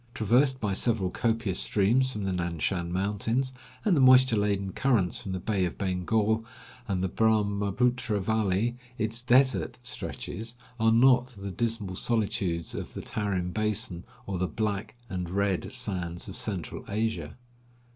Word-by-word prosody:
Traversed 130 +5 +3
by 105 -4 -1
several 100 -3 +1
copious 115 -5 0
streams 120 +6 +2
from 105 -4 -4
the 95 -1 -1
Nan 85 -2 -2
Shan 85 +1 -1
mountains, 105 +7 0 0.3
and 200 -5 +4
the 140 - +3
moisture 130 -2 +7
laden 100 -2 0
currents 110 -6 +1
from 95 - -5
the 95 - -2
Bay 100 +1 0
of 85 - -4
Bengal 105 +4 +1 0.4
and 95 -3 -1
the - - +2
Brahmaputra 105 +2 +1
valley, 110 +3 0 0.2
its 110 +2 -1
"desert" 130 +2 +3
stretches 115 -2 -5 0.2
are 110 0 +4
not 125 +1 +4
the 100 0 -5
dismal 110 -3 -2
solitudes 100 -7 -1
of - - -6
the - - -4
Tarim 95 -4 -2
basin 105 -5 -1 0.2
or 95 -2 -3
the 95 - +1
"Black" 105 +4 -2
and 90 -5 -4
"Red" 100 0 0
sands 90 -9 -3
of - - -7
central 95 -7 -4
Asia. 100 -8 -2
105 Hz, 150 wpm, -28 LUFS, 95-115 Hz, 0.4 s, moisture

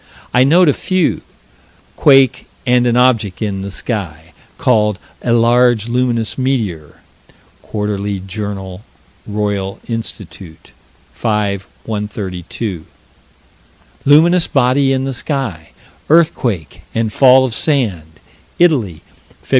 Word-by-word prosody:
I 125 - +5
note 170 +6 +4
a 145 - +4
few 185 +1 0 0.7
quake 135 -3 +4 0.2
and 125 -1 +3
an 120 0 +2
object 115 -7 +2
in 100 -3 -3
the 100 - -5
sky, 85 -7 -5 0.2
called 105 -5 +2 0.2
"a 120 - -1
large, 120 -1 +3
luminous 120 -1 -1
meteor" 110 - -2 0.6
(Quar. 105 -1 -3 0.3
Jour. 95 -1 -6 0.5
Roy. 100 -2 -2
Inst., 115 0 -4 0.9
5 105 -4 -1 0.2
132); 100 -3 -5 1.2
luminous 165 +5 +5
body 135 0 +2
in 130 0 0
the 135 0 -3
sky, 120 - -4 0.4
earthquake, 120 - +1
and 115 -2 -1
fall 130 -1 +6
of 125 - -4
sand, 100 - -1 0.4
Italy, 125 - +2 0.4
Feb. - - -21
115 Hz, 105 wpm, -16 LUFS, 100-130 Hz, 1.2 s, fall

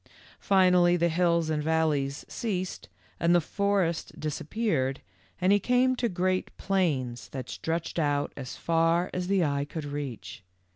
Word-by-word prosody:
"Finally 180 -2 +4
the 170 0 +2
hills 170 -1 +2
and 150 -1 0
valleys 150 -3 0
ceased 185 -5 -4 0.3
and 170 +1 +3
the - - +6
forest 195 -1 -1
disappeared 150 - -1 0.4
and 185 +2 +4
he 205 - +4
came 250 +4 +2
to 240 -1 0
great 185 0 0
plains 130 - -1
that 130 -2 -6
stretched 165 +1 -3
out 145 -2 0
as 135 0 -7
far 165 +1 +1
as 180 0 -3
eye 145 -8 +2
could 150 +1 -6
reach. 145 -9 -6
170 Hz, 140 wpm, -28 LUFS, 145-185 Hz, 0.4 s, the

